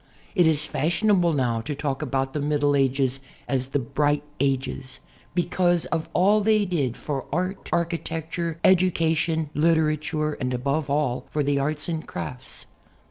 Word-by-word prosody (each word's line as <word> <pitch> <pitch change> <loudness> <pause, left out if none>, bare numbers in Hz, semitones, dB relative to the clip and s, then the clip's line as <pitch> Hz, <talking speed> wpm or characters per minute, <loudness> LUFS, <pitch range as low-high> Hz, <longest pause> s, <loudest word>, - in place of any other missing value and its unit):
It 180 -5 +4
is 155 -2 +2
fashionable 175 +3 +2
now 125 -6 0
to 145 +5 -4
talk 140 -1 -2
about 135 -2 -1
the 150 - -1
Middle 145 0 +2
Ages 135 -1 +1 0.3
as 130 -2 -1
the 135 - -1
"Bright 145 +3 0 0.2
Ages" 130 -1 -1 0.4
because 175 -1 +2
of 165 -1 -1
all 205 +4 +4
they 215 0 +3
did 145 - -1
for 140 -3 -4
art, 185 +5 -2
architecture, 165 -1 -2
education, 165 -4 +2
literature, 155 -1 +1
and 125 -2 -2
above 140 +4 -1
all, 135 -3 0
for 150 - 0
the 140 0 +1
arts 150 +2 -2
and 165 -2 -3
crafts. 130 -2 -7
150 Hz, 145 wpm, -25 LUFS, 135-170 Hz, 0.4 s, It